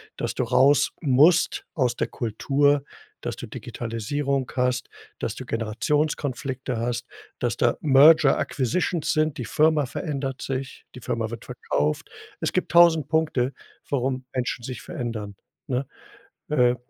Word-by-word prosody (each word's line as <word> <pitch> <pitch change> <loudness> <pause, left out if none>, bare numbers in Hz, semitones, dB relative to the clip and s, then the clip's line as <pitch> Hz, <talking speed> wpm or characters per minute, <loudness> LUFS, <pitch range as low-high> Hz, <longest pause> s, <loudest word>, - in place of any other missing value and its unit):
Dass - - -3
du 125 - 0
raus 130 +4 +4
musst 155 +5 +4
aus 125 -5 +1
der - - -1
Kultur, 140 +5 +1 0.4
dass - - -4
du - - -7
Digitalisierung 130 +3 -3
hast, 125 0 0 0.3
dass - - -3
du - - -7
Generationskonflikte 130 +2 -1
hast, 120 +1 -2 0.3
dass 120 -1 -1
da 120 - +2
merger 145 0 +6
acquisitions 160 - 0
sind. 155 -1 +1
Die 120 - -4
Firma 155 -2 +3
verändert 135 -2 -4
sich, 135 -1 -5
die 125 - -9
Firma 115 0 -2
wird 115 - -8
verkauft. 75 +1 -2 0.3
Es - - -2
gibt 185 - -1
1.000 170 -4 +6
Punkte, 150 -5 +1 0.4
warum 130 -1 -1
Menschen 125 -1 -2
sich 125 -2 -6
verändern, 110 -4 -5 0.3
ne? 130 +1 -1 0.6
Äh, 125 -4 +3
130 Hz, 135 wpm, -25 LUFS, 120-145 Hz, 0.6 s, merger